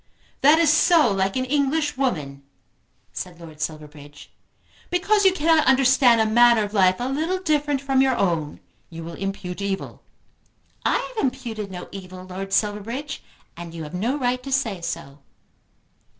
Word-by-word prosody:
"That 295 Hz, +3 st, +6 dB
is 325 Hz, -2 st, +4 dB
so 310 Hz, -, +4 dB
like 195 Hz, 0 st, 0 dB
an 255 Hz, 0 st, 0 dB
English 290 Hz, +2 st, 0 dB
woman," 150 Hz, -, -2 dB, 0.7 s
said 175 Hz, -2 st, -7 dB
Lord 160 Hz, -2 st, -12 dB
Silverbridge. 150 Hz, -2 st, -8 dB, 0.6 s
"Because 400 Hz, +3 st, +2 dB
you 380 Hz, -, +7 dB
cannot 320 Hz, -3 st, +2 dB
understand 265 Hz, -2 st, +5 dB
a 220 Hz, -, +3 dB
manner 235 Hz, 0 st, +5 dB
of 205 Hz, 0 st, -6 dB
life 185 Hz, -3 st, +4 dB
a 245 Hz, -, -3 dB
little 315 Hz, +7 st, -1 dB
different 295 Hz, -5 st, 0 dB
from 270 Hz, -1 st, +2 dB
your 265 Hz, -2 st, +2 dB
own 165 Hz, -6 st, -1 dB, 0.3 s
you 165 Hz, -1 st, -8 dB
will 170 Hz, +1 st, -8 dB
impute 195 Hz, 0 st, -5 dB
evil." 195 Hz, -1 st, -4 dB, 0.8 s
"I -, -, +2 dB
have 475 Hz, -3 st, -4 dB
imputed 240 Hz, -6 st, -3 dB
no 180 Hz, -1 st, -8 dB
evil, 185 Hz, -1 st, -9 dB
Lord 190 Hz, +1 st, -7 dB
Silverbridge, 220 Hz, +8 st, -2 dB, 0.3 s
and 170 Hz, -1 st, -9 dB
you 165 Hz, -, -6 dB
have 150 Hz, -, -9 dB
no 230 Hz, +10 st, -1 dB
right 250 Hz, -2 st, -1 dB
to 270 Hz, +1 st, -8 dB
say 225 Hz, -9 st, -1 dB
so." 150 Hz, -4 st, -6 dB
225 Hz, 160 wpm, -23 LUFS, 180-275 Hz, 0.8 s, you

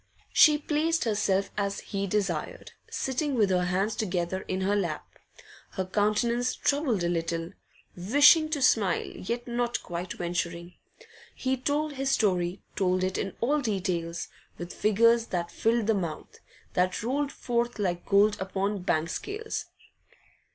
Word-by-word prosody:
She 300 Hz, -2 st, +7 dB
placed 310 Hz, +2 st, 0 dB
herself 200 Hz, -3 st, +1 dB
as 200 Hz, -1 st, -1 dB
he 200 Hz, 0 st, -3 dB
desired, 190 Hz, -6 st, -2 dB, 0.2 s
sitting 270 Hz, +2 st, -1 dB
with 210 Hz, -5 st, +3 dB
her 180 Hz, -1 st, +2 dB
hands 195 Hz, +4 st, 0 dB
together 185 Hz, -3 st, -2 dB
in 185 Hz, 0 st, -2 dB
her 200 Hz, +2 st, +1 dB
lap, 170 Hz, -7 st, -2 dB, 0.7 s
her 190 Hz, -, -2 dB
countenance 235 Hz, +5 st, +1 dB
troubled 280 Hz, -, 0 dB
a -, -, +1 dB
little, 165 Hz, 0 st, -2 dB, 0.4 s
wishing 290 Hz, -, +5 dB
to 295 Hz, -4 st, -1 dB
smile, 205 Hz, -7 st, +3 dB
yet 235 Hz, +5 st, -5 dB
not 240 Hz, 0 st, -1 dB
quite 175 Hz, 0 st, -5 dB
venturing. 175 Hz, 0 st, -3 dB, 0.3 s
And -, -, -17 dB, 0.3 s
he 260 Hz, 0 st, 0 dB
told 290 Hz, +3 st, -1 dB
his 270 Hz, 0 st, -2 dB
story, 185 Hz, -6 st, +1 dB
told 185 Hz, -1 st, +1 dB
it 185 Hz, 0 st, -1 dB
in 195 Hz, -, -3 dB
all 290 Hz, +5 st, +2 dB
details, 180 Hz, -7 st, -2 dB, 0.3 s
with 175 Hz, 0 st, -7 dB
figures 230 Hz, +2 st, +3 dB
that 170 Hz, -1 st, -3 dB
filled 230 Hz, 0 st, +1 dB
the 225 Hz, -, +3 dB
mouth, 170 Hz, -6 st, -4 dB, 0.3 s
that 185 Hz, +2 st, 0 dB
rolled 275 Hz, +4 st, -1 dB
forth 240 Hz, -3 st, -2 dB
like 180 Hz, -4 st, -1 dB
gold 205 Hz, +1 st, +4 dB
upon 195 Hz, +2 st, -1 dB
the 205 Hz, -, -4 dB
bank 165 Hz, -3 st, 0 dB
scales. 435 Hz, +2 st, -4 dB
205 Hz, 150 wpm, -28 LUFS, 180-245 Hz, 0.7 s, She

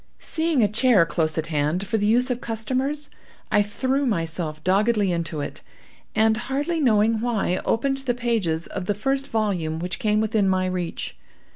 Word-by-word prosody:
Seeing 320 Hz, -6 st, 0 dB
a -, -, +5 dB
chair 215 Hz, -3 st, +4 dB
close 160 Hz, -2 st, -1 dB
at 160 Hz, -, 0 dB
hand, 150 Hz, +6 st, 0 dB
for 220 Hz, +2 st, 0 dB
the 205 Hz, -, +1 dB
use 250 Hz, +4 st, +3 dB
of 245 Hz, 0 st, -2 dB
customers, 265 Hz, +6 st, -2 dB, 0.4 s
I 205 Hz, -, +5 dB
threw 260 Hz, +7 st, 0 dB
myself 165 Hz, -6 st, -2 dB
doggedly 205 Hz, +1 st, +2 dB
into 170 Hz, -3 st, -2 dB
it, 145 Hz, -, -6 dB, 0.5 s
and, 220 Hz, 0 st, +3 dB
hardly 280 Hz, +7 st, -2 dB
knowing 225 Hz, -4 st, +3 dB
why, 220 Hz, -6 st, 0 dB
opened 270 Hz, +4 st, +1 dB
the 260 Hz, -3 st, -1 dB
pages 220 Hz, -10 st, 0 dB
of 180 Hz, -, -6 dB
the 205 Hz, -, +1 dB
first 270 Hz, +6 st, -1 dB
volume 185 Hz, -8 st, -1 dB
which 180 Hz, +2 st, -3 dB
came 215 Hz, -4 st, +2 dB
within 215 Hz, -2 st, +2 dB
my 185 Hz, 0 st, +1 dB
reach. 180 Hz, -2 st, -4 dB
215 Hz, 170 wpm, -24 LUFS, 180-245 Hz, 0.5 s, a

